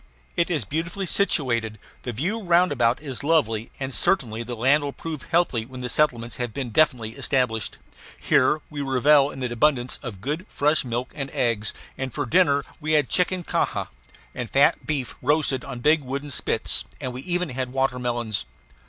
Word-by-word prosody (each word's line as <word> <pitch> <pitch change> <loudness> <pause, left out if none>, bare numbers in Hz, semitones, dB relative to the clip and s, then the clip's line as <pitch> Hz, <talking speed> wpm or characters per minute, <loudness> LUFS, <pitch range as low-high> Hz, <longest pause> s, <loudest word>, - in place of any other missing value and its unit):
It 170 - +2
is 155 - 0
beautifully 170 - -3
situated: 120 - +1 0.2
the 125 - -4
view 175 - -2
roundabout 170 - +3
is 135 -2 -4
lovely, 125 -8 +1
and 135 -1 -3
certainly 120 - +1
the 120 +1 -5
land 135 +6 +3
will 140 -1 -3
prove 155 -4 -6
healthy 165 -9 +1
when 125 +1 -6
settlements 120 -5 0
have 120 -3 -4
been 130 -4 -3
definitely 120 -5 +2
established. 115 -3 -1 0.4
Here 150 +4 +3
we 145 -1 -4
revelled 140 +1 +4
in 135 - -6
abundance 125 +1 +1
of 115 -8 -7
good 150 - -3
fresh 150 +2 +2
milk 125 +1 -3
and 140 -3 -4
eggs; 115 -5 0 0.3
and 135 -1 -3
for - - -2
dinner 145 -6 +3
we 155 0 -1
had 150 -4 +3
chicken 180 0 +1
canja - - -1 0.4
and 120 - -5
fat 140 - +3
beef 140 -5 -2
roasted 140 -1 +1
on 125 -3 -7
big 150 +4 +4
wooden 140 +2 -5
spits; 65 - +1 0.2
and 125 - -4
we 125 - -6
even 180 +2 -1
had 130 -1 -3
watermelons. 125 - -1
135 Hz, 170 wpm, -24 LUFS, 120-150 Hz, 0.4 s, revelled